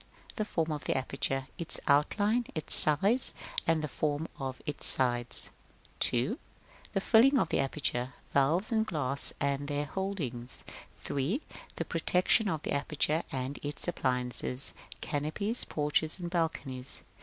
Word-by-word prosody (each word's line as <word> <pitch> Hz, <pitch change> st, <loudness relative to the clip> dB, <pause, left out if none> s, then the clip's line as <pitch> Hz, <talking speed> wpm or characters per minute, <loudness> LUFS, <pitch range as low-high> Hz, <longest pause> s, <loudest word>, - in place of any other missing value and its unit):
The 215 Hz, -, -2 dB
form 165 Hz, -6 st, -1 dB
of 150 Hz, -1 st, -5 dB
the -, -, 0 dB
aperture, 135 Hz, 0 st, -2 dB
i.e., -, -, -29 dB
its 170 Hz, -, +3 dB
outline, 205 Hz, +11 st, +2 dB
its 155 Hz, -, +1 dB
size, 195 Hz, -, +6 dB, 0.3 s
and 165 Hz, -1 st, +2 dB
the -, -, -1 dB
forms 150 Hz, +2 st, -2 dB
of 130 Hz, -2 st, -4 dB
its 150 Hz, -3 st, -1 dB
sides. 120 Hz, -2 st, +4 dB, 0.5 s
2. 160 Hz, -, +1 dB, 0.5 s
The 195 Hz, -, 0 dB
filling 245 Hz, +7 st, +5 dB
of -, -, +1 dB
the -, -, 0 dB
aperture, 130 Hz, -2 st, -2 dB
i.e., -, -, -28 dB
valves 160 Hz, -, +2 dB
and 220 Hz, -1 st, +2 dB
glass, 140 Hz, -8 st, -1 dB
and 140 Hz, 0 st, -1 dB
their 145 Hz, 0 st, -2 dB
holdings. 145 Hz, -10 st, -4 dB, 0.4 s
3. 155 Hz, -, -2 dB, 0.3 s
The -, -, -3 dB
protection 180 Hz, +5 st, +2 dB
of 160 Hz, -4 st, -3 dB
the -, -, -3 dB
aperture, 150 Hz, +2 st, 0 dB
and 130 Hz, +1 st, -4 dB
its 145 Hz, +3 st, -3 dB
appliances, 125 Hz, -3 st, +1 dB
i.e., -, -, -13 dB
canopies, 155 Hz, +11 st, -2 dB
porches, 155 Hz, +3 st, 0 dB
and 175 Hz, -1 st, -5 dB
balconies. 140 Hz, -7 st, -3 dB
150 Hz, 150 wpm, -30 LUFS, 135-180 Hz, 0.5 s, size